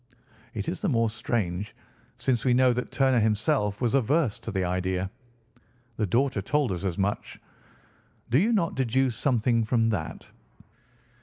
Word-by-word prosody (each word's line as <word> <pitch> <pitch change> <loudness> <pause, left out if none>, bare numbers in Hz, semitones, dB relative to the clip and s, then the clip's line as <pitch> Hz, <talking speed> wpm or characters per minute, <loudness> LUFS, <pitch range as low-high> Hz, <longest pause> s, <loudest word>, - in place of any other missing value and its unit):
It - - -3
is - - -3
the 205 - +1
more 115 -5 +2
strange, 105 -4 -2 0.4
since 120 -4 0
we 125 -2 +3
know 130 -1 +4
that 125 +1 -4
Turner 130 -3 +3
himself 105 0 +1
was 120 -1 +1
averse 135 -1 +2
to - - -7
the 95 -1 -1
idea. 90 +1 -1 0.9
The 110 - 0
daughter 120 +2 +1
told 140 +3 0
us 90 0 -4
as 90 -3 -2
much. 100 +1 -2 0.9
Do 130 - +5
you 215 +7 +2
not 185 -7 +1
deduce 130 -1 +1
something 120 -3 +1
from 115 0 +2
that?" 90 -8 -4
115 Hz, 155 wpm, -27 LUFS, 100-130 Hz, 0.9 s, Do